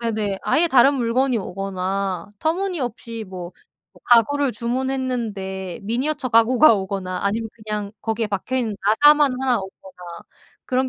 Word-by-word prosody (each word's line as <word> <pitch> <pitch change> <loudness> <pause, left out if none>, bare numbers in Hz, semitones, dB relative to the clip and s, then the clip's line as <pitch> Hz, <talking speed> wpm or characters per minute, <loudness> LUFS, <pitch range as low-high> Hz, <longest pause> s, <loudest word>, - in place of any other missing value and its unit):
네네. 215 -4 -2
아예 340 +2 +3
다른 270 0 +5
물건이 255 +1 +1
오거나 190 -1 -3
터무니없이 275 - -3
뭐 180 -1 -8 0.5
가구를 270 +4 +4
주문했는데 235 -7 -3
미니어처 255 +6 -1
가구가 230 +3 +5
오거나 190 -2 -4
아니면 220 +3 -1
그냥 210 -2 -5
거기에 225 0 -2
박혀 210 +6 -3
있는 225 -5 -1
나사만 290 +6 +5
하나 255 -2 +2
오거나 190 0 -11 0.7
그런 260 0 0
230 Hz, 320 characters per minute, -21 LUFS, 195-260 Hz, 0.7 s, 다른